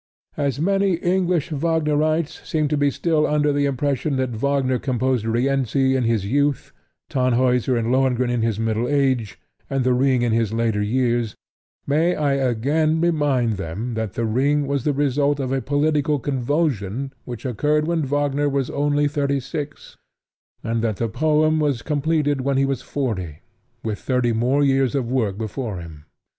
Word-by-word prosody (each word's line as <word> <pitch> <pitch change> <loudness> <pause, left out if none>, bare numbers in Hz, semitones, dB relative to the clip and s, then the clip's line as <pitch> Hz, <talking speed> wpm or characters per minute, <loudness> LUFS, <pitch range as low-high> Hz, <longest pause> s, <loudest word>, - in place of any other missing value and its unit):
As 140 -2 -1
many 195 +3 +2
English 175 -2 0
Wagnerites 155 0 0
seem 155 -2 0
to 150 - +1
be 145 -1 +2
still 155 +2 +1
under 150 -1 +2
the 145 0 +1
impression 140 +1 -1
that 130 -1 -1
Wagner 130 +1 0
composed 130 -3 0
Rienzi 130 +2 +1
in 130 -2 +1
his 115 -4 +1
youth, 140 +5 0 0.4
Tannhauser 125 -1 +1
and 115 +1 -1
Lohengrin 130 -1 +2
in 120 -1 0
his 110 -2 0
middle 115 +1 0
age, 130 -7 0 0.3
and 135 -1 0
The 125 0 +2
Ring 130 -1 +2
in 120 - +1
his 115 -2 +1
later 115 -2 0
years, 120 0 0 0.5
may 160 +5 +2
I 145 -2 +1
again 140 +5 +1
remind 145 - +1
them 95 +8 -4
that 110 -3 -3
The 115 - -2
Ring 140 +6 +1
was 140 -2 -2
the 150 - +2
result 145 +1 +1
of 130 -2 -2
a 135 0 0
political 145 +1 +1
convulsion 135 - -1
which 120 0 -7
occurred 150 +5 +1
when 170 0 0
Wagner 145 +1 0
was 135 -2 -1
only 145 0 +1
thirty 140 -1 0
six, 145 +2 -7 0.7
and 115 0 -1
that 110 -4 -1
the 115 - -1
poem 155 +5 +2
was 140 -6 0
completed 145 -1 0
when 135 +1 0
he 135 - +3
was 135 -3 -2
forty, 95 - -4 0.4
with 110 -2 -3
thirty 125 -2 0
more 125 +6 +2
years 135 -1 +2
of 125 -3 -1
work 110 -7 0
before 110 -1 -4
him? 80 -3 -11
135 Hz, 165 wpm, -22 LUFS, 120-145 Hz, 0.7 s, he